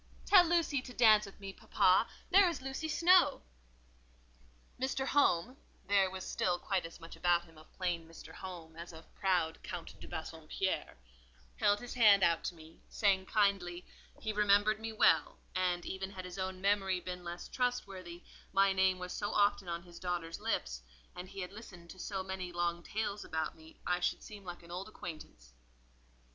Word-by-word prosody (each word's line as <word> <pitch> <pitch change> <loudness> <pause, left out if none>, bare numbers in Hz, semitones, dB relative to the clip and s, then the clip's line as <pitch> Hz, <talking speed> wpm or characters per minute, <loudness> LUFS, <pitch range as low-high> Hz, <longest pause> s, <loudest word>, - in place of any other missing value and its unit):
"Tell 380 -3 +8
Lucy 335 -5 +1
to 250 -1 -11
dance 215 -3 +6
with 195 - -14
me, 195 -1 -7
papa; 185 +3 +3 0.2
there 380 0 +7
is 335 - -4
Lucy 270 +4 -3
Snowe." 345 +4 +4 1.4
Mr. 265 0 0
Home 255 -4 +2 0.3
(there 195 -1 +3
was 190 0 -6
still 180 -1 0
quite 185 -2 -1
as 165 - -14
much 165 - -10
about 175 -1 +2
him 165 -1 -19
of 155 +1 -17
plain 175 -3 -2
Mr. 165 - -12
Home 170 -4 -9
as 170 +1 -9
of 160 0 -14
proud 180 -5 0
Count 175 -1 -7
de - - -10
Bassompierre) 160 - -3 0.6
held 205 0 +3
his 245 +1 -7
hand 210 -5 +6
out 170 -1 +3
to 175 - -3
me, 160 0 -15
saying 190 -3 +2
kindly, 195 -4 +1 0.3
"he 220 -1 -3
remembered 210 +1 +4
me 225 0 -4
well; 220 - +3 0.2
and, 180 -1 0
even 190 0 -4
had 185 -2 -8
his 180 +1 -8
own 185 0 -3
memory 195 -1 +1
been 180 0 -6
less 175 0 -6
trustworthy, 195 -9 -3 0.3
my 195 0 +4
name 190 -1 +3
was 180 0 -6
so 205 0 -2
often 205 -3 +2
on 170 0 -3
his 175 -1 -13
daughter's 175 -2 -3
lips, - - -2 0.3
and 180 +1 -7
he 195 - -7
had 180 - -5
listened 180 -6 -11
to 185 - -13
so 195 -1 -3
many 185 -1 -5
long 175 0 -1
tales 205 +2 -3
about 160 -1 -3
me, 160 0 -16
I 180 0 +1
should 175 - -1
seem 205 -2 -11
like 175 -1 -8
an 170 - -13
old 185 +4 -5
acquaintance." 155 - -10
185 Hz, 180 wpm, -33 LUFS, 175-205 Hz, 1.4 s, Tell